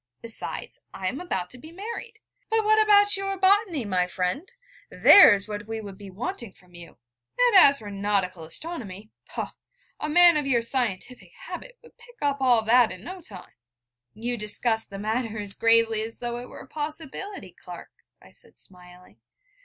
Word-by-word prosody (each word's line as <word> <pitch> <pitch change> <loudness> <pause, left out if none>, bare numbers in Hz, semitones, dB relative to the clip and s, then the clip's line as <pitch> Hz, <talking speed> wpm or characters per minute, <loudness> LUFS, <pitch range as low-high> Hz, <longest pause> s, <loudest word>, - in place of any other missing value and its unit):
Besides, 230 -1 -5
I 190 - -4
am 270 - -6
about 185 - -4
to 250 - -7
be 315 +5 -13
married....' 440 +4 -8 0.3
'But 445 -1 +1
what 435 0 +4
about 410 -1 +5
your 390 0 -4
botany, 380 - +3
my 180 -3 0
friend? 185 - -4 0.4
There's 205 - +7
what 210 0 -7
we 225 0 -5
should 200 -2 -10
be 200 -1 -10
wanting 235 - -6
from 180 -1 -25
you: 175 -1 -13 0.4
and - - +3
as 280 -6 +7
for 210 -4 -9
nautical 195 -3 -2
astronomy, 215 - -7 0.2
poh, - - -5 0.5
a 300 - -3
man 345 +1 +6
with 295 -2 -2
your 240 -3 +1
scientific 230 -5 -3
habit - - -9
would 470 - -20
pick 485 - -16
all 265 -6 +2
that 240 +2 +5
up - - -8
in 185 +1 -10
no 370 +6 -9
time.' 195 - -12 0.6
'You 240 +3 -4
discuss 220 +1 -1
the 195 - -9
matter 220 +2 -3
as 205 -2 +5
gravely 225 0 +4
as 225 +1 -5
though 240 0 -4
it 245 - -9
were - - -10
a - - -13
possibility, 315 +6 -6
Clark,' - - -12 0.3
I - - -19
said, - - -19
smiling. 180 -1 -11
235 Hz, 175 wpm, -25 LUFS, -, 0.6 s, There's